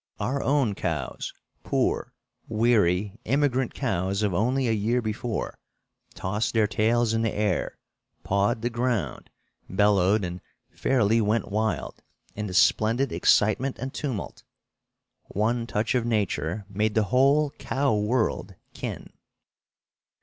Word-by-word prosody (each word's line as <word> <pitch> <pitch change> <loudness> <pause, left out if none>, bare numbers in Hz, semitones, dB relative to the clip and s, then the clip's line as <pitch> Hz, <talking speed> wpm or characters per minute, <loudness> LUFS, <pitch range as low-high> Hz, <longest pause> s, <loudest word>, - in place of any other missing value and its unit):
Our 130 +7 -1
own 135 -6 +2
cows, - - -3 0.3
poor, - - 0 0.4
weary, 105 -3 +2
immigrant 130 -1 +1
cows 95 +3 -1
of 100 -3 +1
only 125 +7 +1
a - - +2
year 110 +3 +1
before, 110 0 -3 0.6
tossed 105 +5 -2
their 110 -1 +4
tails 110 +2 +1
in 115 - +1
the 115 -2 +1
air, 105 0 -1 0.5
pawed 100 +4 +1
the 120 - 0
ground, 115 - -2 0.4
bellowed 100 +1 +3
and 90 0 -5 0.3
fairly 115 -3 +2
went 110 +2 0
wild 110 +1 -2 0.3
in 105 0 -3
the 95 - -6
splendid 115 +8 +3
excitement 115 +6 +2
and 130 +2 -5
tumult. 130 -9 -4 0.8
One 115 +3 -1
touch 110 +3 0
of 125 -2 +1
nature 105 -4 -1
made 105 +1 -1
the 110 - +4
whole 140 +3 +4
cow 135 -4 0
world 110 +3 0 0.2
kin! - - -6
110 Hz, 125 wpm, -26 LUFS, 105-120 Hz, 0.8 s, their